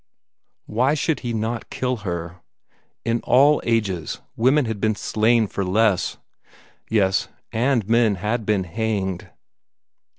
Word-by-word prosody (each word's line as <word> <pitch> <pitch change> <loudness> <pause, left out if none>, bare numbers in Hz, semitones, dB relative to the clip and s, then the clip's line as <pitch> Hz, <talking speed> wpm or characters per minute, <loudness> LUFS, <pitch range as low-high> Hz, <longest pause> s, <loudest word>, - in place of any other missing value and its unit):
Why 130 +7 +1
should 155 +1 0
he 120 - -4
not 115 +1 -3
kill 125 -1 -2
her? 85 -3 -5 0.6
In 115 0 0
all 145 +4 +5
ages, 100 -8 -1 0.2
women 130 +5 +3
had 110 -3 -4
been 110 -1 +1
slain 110 +2 +2
for 100 -1 -3
less. 100 0 +1 0.7
Yes 95 -3 +2 0.2
and 120 -2 +1
men 115 -2 +3
had 105 +5 -2
been 105 -2 +1
hanged. 95 -1 -3
110 Hz, 125 wpm, -22 LUFS, 100-120 Hz, 0.7 s, all